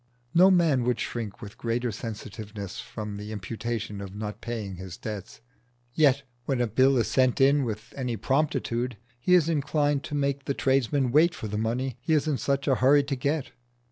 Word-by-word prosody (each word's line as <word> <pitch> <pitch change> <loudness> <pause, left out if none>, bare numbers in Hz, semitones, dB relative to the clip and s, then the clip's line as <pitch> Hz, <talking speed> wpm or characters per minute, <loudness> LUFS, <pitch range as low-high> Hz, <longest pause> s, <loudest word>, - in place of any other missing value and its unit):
No 180 +3 +7
man 165 -9 +4
would 125 -2 +1
shrink 110 -4 -4
with 105 0 -10
greater 120 +1 -1
sensitiveness 105 -3 -7
from 105 -2 -6
the 105 +1 -7
imputation 110 0 -4
of 100 0 -8
not 105 0 -5
paying 105 -6 -4
his 95 -1 -8
debts, 105 +1 -7 0.5
yet 140 -2 +4 0.2
when 135 -3 0
a 120 - +3
bill 130 +4 +3
is 115 -3 +2
sent 130 +3 +2
in 140 +1 +5
with 110 -1 -5
any 125 -4 -2
promptitude 130 -2 0 0.2
he 180 +9 +4
is 165 -3 +4
inclined 145 -2 +1
to 150 - -4
make 140 -1 -1
the 140 - -1
tradesman 135 -1 +1
wait 165 +5 +4
for 110 - -5
the 105 - -4
money 120 +4 -2
he 160 - 0
is 155 0 +2
in 145 -4 0
such 140 0 0
a 135 - +4
hurry 140 +3 +5
to 140 0 -2
get. 140 +3 -1
125 Hz, 190 wpm, -27 LUFS, 110-140 Hz, 0.5 s, No